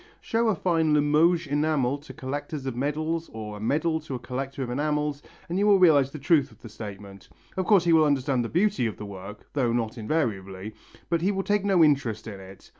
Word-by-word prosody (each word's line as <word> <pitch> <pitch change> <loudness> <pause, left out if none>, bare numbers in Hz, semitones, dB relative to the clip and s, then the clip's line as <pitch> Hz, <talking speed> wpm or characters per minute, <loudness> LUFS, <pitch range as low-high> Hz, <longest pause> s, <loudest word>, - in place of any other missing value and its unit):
Show 230 +1 0
a 215 - +2
fine 160 -3 +2
Limoges 155 +4 +3
enamel 145 -2 0
to 145 - -12
a - - -14
collector 145 +3 -5
of 135 -4 -4
medals 155 +5 -2
or 105 -1 -6
a - - -10
medal 160 +8 0
to 150 -4 -6
a - - -2
collector 135 +2 -4
of 120 - -4
enamels 150 +1 -1 0.3
and 175 +2 -2
you 205 - +3
will 205 -1 +6
realize 150 -7 +5
the 150 - -8
truth 145 -2 +2
of 110 - -19
the 115 - -9
statement. 100 -2 -10 0.3
Of 185 -1 -2
course 200 -5 +5
he 170 -1 +3
will 160 -1 +6
understand 135 -3 +1
the 115 - -4
beauty 190 - +1
of 110 - -6
the 105 - -7
work 100 +1 -10
though 130 -5 +1
not 115 0 -2
invariably 105 -6 -2 0.3
but 170 -1 0
he 190 +4 +2
will 195 -1 -2
take 205 0 +1
no 190 -4 +4
interest 135 -8 +1
in 100 -3 -7
it. 95 0 -13
145 Hz, 225 wpm, -26 LUFS, 115-165 Hz, 0.3 s, will